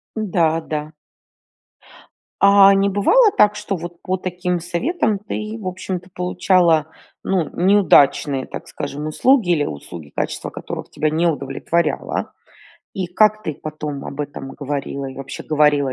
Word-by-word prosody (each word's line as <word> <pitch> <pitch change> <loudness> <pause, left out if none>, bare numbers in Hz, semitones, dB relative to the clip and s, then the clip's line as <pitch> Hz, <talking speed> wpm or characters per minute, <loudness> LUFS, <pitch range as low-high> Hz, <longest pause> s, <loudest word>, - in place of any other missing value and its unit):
Да-да. 165 -7 -1 1.5
А 200 0 +7
не 195 0 +2
бывало 405 - +4
так, 210 0 +5
что 210 -1 -3
вот 170 +1 -9
по 185 0 -1
таким 180 -1 -2
советам 205 - -1
ты, 215 +1 -5
в 190 - -6
общем-то, 185 0 -5
получала, 180 -3 +2 0.4
ну, 180 -5 0
неудачные, 155 -8 +4
так - - -8
скажем, 150 +2 -5
услуги, 230 - +3
или 150 -4 +2
услуги, 75 +1 -8
качество - - -3
которых - - -7
тебя 155 - 0
не 165 +3 +1
удовлетворяло? 150 +2 -2 0.6
И 185 -2 -2
как 215 +3 +3
ты 155 - -3
потом 150 -2 -6
об 140 +2 -6
этом 140 -2 -6
говорила, 140 -1 -4
и 135 - -8
вообще 135 0 -7
говорила 150 -3 +2
175 Hz, 135 wpm, -20 LUFS, 150-195 Hz, 1.5 s, А